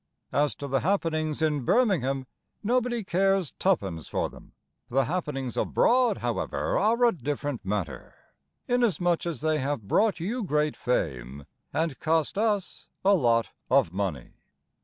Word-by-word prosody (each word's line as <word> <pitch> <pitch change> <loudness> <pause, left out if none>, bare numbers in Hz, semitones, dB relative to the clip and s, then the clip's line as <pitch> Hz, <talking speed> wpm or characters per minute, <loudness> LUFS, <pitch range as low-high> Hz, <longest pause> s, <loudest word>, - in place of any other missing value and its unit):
As 145 +1 +1
to 140 - -6
the 135 0 +1
happenings 160 -4 0
in 150 -4 +1
Birmingham, 135 - +2 0.4
Nobody 240 0 +1
cares 190 -2 +1
tuppence 95 - 0
for - - -1
them. - - -15 0.4
The 135 +1 +2
happenings 145 -6 -3
abroad, 250 0 +3
however, - - -2
are 235 +2 +3
a 235 - +5
different 145 - -4
matter, 95 -9 -4 0.5
Inasmuch 190 -9 +1
as 160 -7 -4
they 155 0 +1
have 135 -6 -2
brought 205 - +2
you 220 +8 -2
great 150 -4 0
fame, 70 - -2 0.3
And 160 -4 -1
cost 160 -1 +1
us 210 -4 -1 0.2
a 200 - +6
lot 115 - +3 0.2
of 80 - +3
money. 95 -10 -3
155 Hz, 135 wpm, -27 LUFS, 130-195 Hz, 0.5 s, a